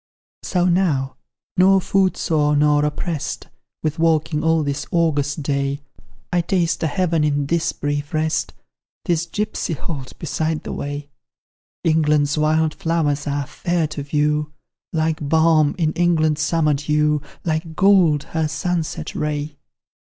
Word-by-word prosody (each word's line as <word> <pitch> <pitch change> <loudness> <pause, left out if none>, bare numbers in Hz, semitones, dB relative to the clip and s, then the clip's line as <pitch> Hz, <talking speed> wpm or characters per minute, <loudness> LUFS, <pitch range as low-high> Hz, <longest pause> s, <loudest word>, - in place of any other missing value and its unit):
So 180 -2 0
now 170 -8 +1 0.4
nor 190 +1 +6
foot 190 -1 +1
sore 150 -2 +1
nor 150 0 +3
opprest 150 +1 -3 0.3
With 155 0 -2
walking 155 -1 +1
all 160 -1 +3
this 145 0 -3
August 150 -3 0
day, 140 0 -1 0.5
I 175 - +3
taste 170 -1 0
a 160 - +1
heaven 165 0 +1
in 145 -1 +1
this 170 +3 0
brief 145 0 -3
rest, 155 0 0 0.5
This 170 -1 0
gipsy 210 -2 -2
halt 140 -3 -6
beside 160 0 -2
the - - -5
way. 145 0 -5 0.7
England's 150 -3 +2
wild 155 0 +2
flowers 155 -3 -1
are 145 0 -1
fair 170 +3 -1
to 155 -1 -5
view, 150 +1 0 0.4
Like 160 -1 0
balm 160 -2 +4
is 160 -3 +1
England's 160 -3 +2
summer 155 0 +2
dew 150 +1 +1 0.2
Like 160 0 -2
gold 185 -7 +4
her 160 -1 +1
sunset 170 +1 -3
ray. 150 0 -3
155 Hz, 135 wpm, -21 LUFS, 145-165 Hz, 0.7 s, nor